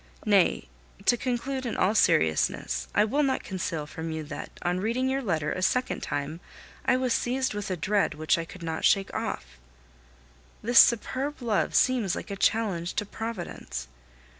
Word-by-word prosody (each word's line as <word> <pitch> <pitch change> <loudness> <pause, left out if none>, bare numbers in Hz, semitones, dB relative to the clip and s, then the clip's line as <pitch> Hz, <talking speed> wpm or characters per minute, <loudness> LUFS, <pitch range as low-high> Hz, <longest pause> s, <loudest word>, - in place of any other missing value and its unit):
Nay - - +3 0.4
to - - +5
conclude 260 +2 -2
in 240 - -3
all 190 +3 +3
seriousness 80 - +2
I 210 - +5
will 275 +7 +1
not 270 -2 +1
conceal 170 -5 -3
from 160 +2 -6
you 160 -1 -3
that, 145 0 -7
on 180 +1 0
reading 235 +6 0
your 265 +1 0
letter 160 - -1
a 185 - -3
second 250 +7 0
time, 145 +3 -3 0.4
I 250 - +3
was 255 -2 +1
seized 260 +1 0
with 205 -1 -4
a 185 - -2
dread 195 0 +1
which 155 +1 +2
I - - -2
could 170 +1 -11
not 160 -1 -3
shake 195 -1 +3
off. - - -4 1.0
This 240 +3 +6
superb 260 +5 +3
love 230 -5 0
seems 240 -8 +3
like - - -6
a - - -2
challenge 190 -5 0
to 210 - -1
Providence. 195 - -6
200 Hz, 170 wpm, -27 LUFS, 160-245 Hz, 1.0 s, This